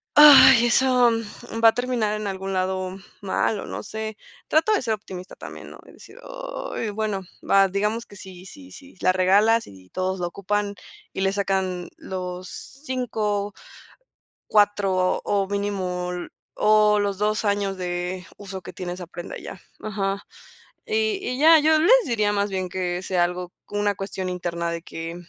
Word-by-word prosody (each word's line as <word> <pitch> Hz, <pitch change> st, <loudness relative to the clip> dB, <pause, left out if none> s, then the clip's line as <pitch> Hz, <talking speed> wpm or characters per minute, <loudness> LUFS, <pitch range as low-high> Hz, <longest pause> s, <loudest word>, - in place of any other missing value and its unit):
ay, 270 Hz, -5 st, +9 dB
eso, 250 Hz, 0 st, +4 dB
mm, 225 Hz, 0 st, -5 dB
va 225 Hz, -, +10 dB
a -, -, +3 dB
terminar 245 Hz, -3 st, -1 dB
en 215 Hz, -1 st, -3 dB
algún 195 Hz, 0 st, -4 dB
lado 185 Hz, 0 st, -2 dB, 0.2 s
mal 200 Hz, +1 st, 0 dB
o -, -, -6 dB
no -, -, -5 dB
sé. 220 Hz, 0 st, -6 dB, 0.3 s
Trato 320 Hz, +7 st, +3 dB
de 420 Hz, -, +2 dB
ser 225 Hz, -3 st, 0 dB
optimista 185 Hz, -3 st, -8 dB
también, -, -, -10 dB
¿no? -, -, -13 dB
Es -, -, -15 dB
decir, -, -, -15 dB
oy, -, -, -5 dB
bueno, 210 Hz, -2 st, -2 dB, 0.3 s
va, 195 Hz, 0 st, +6 dB
digamos 210 Hz, +4 st, -1 dB
que -, -, -15 dB
si 185 Hz, -2 st, -11 dB
si 275 Hz, +6 st, -13 dB
si 275 Hz, -4 st, -14 dB
la 185 Hz, -, +4 dB
regalas, 200 Hz, +5 st, +3 dB
y 95 Hz, -1 st, -15 dB
todos 185 Hz, -, -2 dB
lo 175 Hz, -, -1 dB
ocupan, 205 Hz, +3 st, -2 dB, 0.4 s
y -, -, -3 dB
le 195 Hz, 0 st, +1 dB
sacan 190 Hz, -3 st, -1 dB
los 180 Hz, -1 st, -6 dB
5, 220 Hz, -6 st, -3 dB, 0.9 s
4 200 Hz, -3 st, +2 dB
o 200 Hz, -1 st, 0 dB
mínimo 190 Hz, -3 st, -2 dB, 0.9 s
los 200 Hz, -1 st, -1 dB
2 210 Hz, +1 st, 0 dB
años 200 Hz, -1 st, 0 dB
de 180 Hz, 0 st, -3 dB
uso 195 Hz, -2 st, -8 dB
que -, -, -9 dB
tiene 180 Hz, -1 st, -5 dB
esa 180 Hz, -1 st, -7 dB
prenda, 175 Hz, +1 st, -8 dB
ya, -, -, -9 dB, 0.2 s
ajá. 200 Hz, -2 st, -2 dB, 0.6 s
Y 440 Hz, -3 st, 0 dB
y 250 Hz, -8 st, -3 dB
ya, 320 Hz, +2 st, +7 dB
yo 310 Hz, +1 st, +4 dB
les 335 Hz, +8 st, +4 dB
diría 215 Hz, -4 st, +1 dB
más 205 Hz, 0 st, 0 dB
bien 185 Hz, -1 st, -3 dB
que 180 Hz, -1 st, -2 dB
sea 185 Hz, -2 st, +1 dB
algo 180 Hz, 0 st, -5 dB
como 205 Hz, 0 st, -3 dB
una 205 Hz, -1 st, +1 dB
cuestión 190 Hz, -1 st, -4 dB
interna 170 Hz, -1 st, -3 dB
de 170 Hz, 0 st, -4 dB
que 165 Hz, 0 st, -7 dB
200 Hz, 170 wpm, -24 LUFS, 185-225 Hz, 0.9 s, va